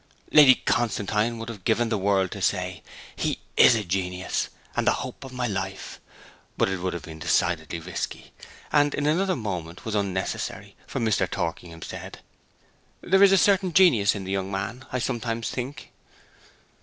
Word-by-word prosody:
Lady 140 -4 +8
Constantine 110 0 0
would 115 0 -6
have 110 -5 -8
given 115 +3 +1
the 110 - 0
world 95 -1 +1
to 100 - -6
say, 90 -3 -1 0.3
'He - - -1 0.2
is 120 - +7
a 110 - -1
genius, 90 0 -2 0.3
and - - 0
the - - +5
hope - - -9
of 135 - -9
my 125 -1 -2
life;' 95 -3 -4 0.6
but - - +3
it 95 -1 -2
would 90 +1 -2
have 85 - -6
been 80 -1 -9
decidedly 85 0 0
risky, 85 +2 -6 0.4
and 145 -1 +3
in 145 - -1
another 185 +5 +2
moment 90 -7 -5
was 110 - -3
unnecessary, 95 -2 -3
for - - -4
Mr. 110 -2 +1
Torkingham 85 -2 -4
said, - - -8 0.8
'There 190 +2 +3
is 200 -1 +8
a 195 - +6
certain 190 -1 +3
genius 120 - +5
in 100 - -5
this 95 - -5
young 95 -1 -1
man, 105 +7 -4
I 125 - -1
sometimes 115 -2 -2
think.' 130 +2 -6
105 Hz, 170 wpm, -25 LUFS, 95-125 Hz, 0.8 s, Lady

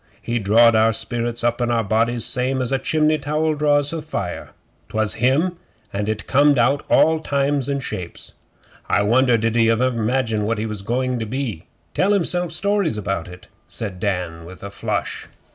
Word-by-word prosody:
He 120 0 -2
drawed 115 +3 +5
our 110 +1 +4
spirits 115 +1 -2
up 120 +1 0
In 120 - +1
our 115 -1 +1
bodies 115 +3 +1
same 130 0 0
as 125 -1 -2
a 135 - +1
chimney 155 +1 +1
towel 155 +2 0
draws 145 0 +1
a 165 - -3
fire. 100 - -5 0.4
'Twas 110 -1 0
in - - -10
him, 155 +8 +2 0.4
and 100 +1 -2
it 110 -1 -3
comed 145 +1 +4
out 135 +4 +2
all 160 0 +4
times 140 -2 -1
and 140 -1 -2
shapes.' 90 -7 -7 0.6
'I 100 - +3
wonder 120 +3 +3
did 115 0 0
he 115 -1 +4
ever 125 +3 +2
'magine 115 -1 0
what 115 +1 -1
he 110 - -2
was 105 -2 -5
going 125 +3 -1
to 110 - -4
be? 120 - -4 0.3
Tell 200 +2 +2
himself 175 -2 0
stories 195 - 0
about 95 -4 -3
it?' 90 0 -12 0.2
said 100 -5 -5
Dan 90 -5 -2
with 90 +3 -12
a 100 - -6
flush. 105 0 -3
120 Hz, 190 wpm, -21 LUFS, 110-140 Hz, 0.6 s, drawed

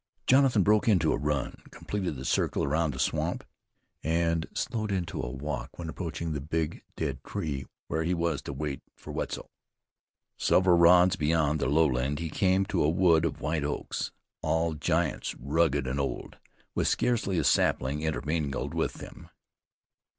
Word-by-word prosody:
Jonathan 130 -6 +5
broke 105 +4 +3
into 90 -8 +4
a - - +2
run, 75 -3 -2
completed 95 -6 -4
the 65 0 -7
circle - - +1
around 80 +2 +1
the 65 - -8
swamp, 65 - -1 0.6
and 85 0 +1
slowed 110 -2 -2
into 90 -4 -2
a - - -4
walk 70 +3 -5
when 85 -2 -5
approaching 80 -1 -4
the 75 - -3
big 80 +2 -2
dead - - -3
tree 70 -4 -4 0.2
where 80 - -1
he 90 +2 0
was 85 -3 -1
to - - -6
wait 70 -1 -4
for - - -10
Wetzel. - - -4 0.9
Several 90 -1 +4
rods 90 +2 +6
beyond 75 -1 +2
the - - 0
lowland 70 -2 +2
he 80 0 -4
came 95 +2 +2
to 95 - 0
a 75 - +3
wood 85 -1 +4
of - - -3
white 80 -1 -1
oaks, 75 0 -3 0.3
all 80 0 +1
giants 80 0 -1
rugged 70 +1 +1
and 65 +2 -2
old, 70 - -4 0.3
with - - 0
scarcely 115 -7 +1
a - - +2
sapling 70 +4 +2
intermingled 75 -2 -2
with - - 0
them. - - -11
80 Hz, 160 wpm, -28 LUFS, 75-85 Hz, 0.9 s, rods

